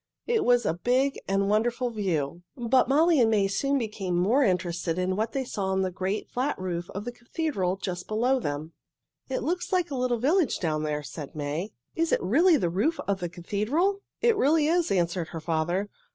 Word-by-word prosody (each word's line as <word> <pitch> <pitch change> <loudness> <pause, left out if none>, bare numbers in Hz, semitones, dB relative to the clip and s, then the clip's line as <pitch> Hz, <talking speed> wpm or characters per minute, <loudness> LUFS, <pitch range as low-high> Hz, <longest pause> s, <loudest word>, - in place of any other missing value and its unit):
It 465 -2 +1
was 245 -2 +3
a - - +2
big 255 +10 +1
and 195 0 +1
wonderful 235 +4 +1
view, 175 -7 -2 0.2
but 245 +1 +2
Molly 315 +3 +4
and 225 - +4
May 205 -3 +3
soon 275 +8 0
became 210 -7 -2
more 215 +11 +3
interested 175 -4 0
in 185 +1 0
what 220 +3 -1
they 270 - -1
saw 200 -5 -3
on 190 0 +1
the 185 - -1
great, 190 +3 -2
flat 265 +4 -1
roof 175 -2 -4
of 200 +2 -4
the 245 - -3
cathedral 240 - -2
just 180 -2 -5
below 245 +5 +2
them. 150 -3 -4 0.6
"It 265 - -2
looks 355 +5 -2
like 360 -4 +1
a - - -2
little 250 -1 +1
village 300 - +2
down 155 -3 -1
there," 150 -1 -2
said 140 +2 -8
May. 155 +7 -3 0.2
"Is 330 0 0
it - - +2
really 310 - +5
the 175 -9 0
roof 245 - 0
of 200 -1 0
the 175 -2 -3
cathedral?" 230 - -1 0.2
"It 470 -1 +4
really 305 -3 +3
is," 340 +2 +2
answered 175 -2 0
her 165 - -6
father. 165 +5 -1
210 Hz, 200 wpm, -27 LUFS, 180-270 Hz, 0.6 s, really